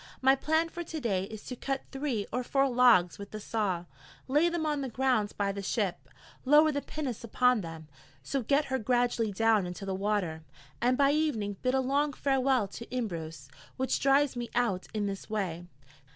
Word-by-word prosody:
My 265 +1 +5
plan 315 +4 +1
for 345 +1 -6
to 320 -1 -6
day 195 -8 0
is 215 +1 -9
to 250 - -6
cut 270 +2 -3
three 270 -7 -2
or 250 - 0
four 275 +2 +2
logs 240 -9 +4
with 200 0 -8
the 215 - -7
saw, 200 -5 -2 0.4
lay 295 +6 +3
them 340 -2 -2
on 295 -2 0
the 265 - -3
ground 250 -4 +1
by 200 -1 +1
the 200 0 -5
ship, 195 -2 -2 0.3
lower 300 +3 +6
the 285 -1 -2
pinnace 275 -8 -5
upon 250 +1 +2
them, 165 -3 -8 0.4
so 270 - -1
get 280 +5 +2
her 265 - +1
gradually 240 -1 +1
down 215 -2 +2
into 180 +3 -7
the 195 - -2
water, 190 -5 -1 0.4
and 250 +1 +3
by 280 0 +4
evening 240 -10 0
bid 255 +1 +1
a 265 - +3
long 285 +3 +1
farewell 265 -5 +1
to 235 +4 -9
Imbros, 165 - -4 0.3
which 260 0 0
drives 275 0 +3
me 240 -1 -4
out 230 -7 0
in 215 -2 -1
this 195 -1 -5
way. 180 -5 -3
245 Hz, 195 wpm, -30 LUFS, 200-275 Hz, 0.4 s, lower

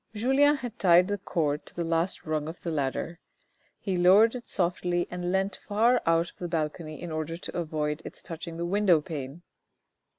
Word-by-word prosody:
Julien 270 +6 +4
had 240 -4 -7
tied 180 0 +5
the 205 0 -1
cord 150 -5 -1
to - - -11
the 175 - -2
last 165 +2 -1
rung 155 -1 -1
of 165 +2 -7
the 170 - -3
ladder. 155 +3 -2 0.6
He 195 -3 -2
lowered 195 +6 +6
it 250 -1 -7
softly 175 -1 0
and 180 0 -3
leant 190 +1 0
far 230 +4 +2
out 165 +1 +2
of - - -33
the 175 - -4
balcony 155 -1 -3
in 175 -2 -6
order 160 +1 -3
to - - -7
avoid 155 -2 -2
its - - -10
touching 165 -1 -7
the 170 - -2
window 190 -2 +3
pane. 150 0 -7
175 Hz, 190 wpm, -28 LUFS, 160-195 Hz, 0.6 s, lowered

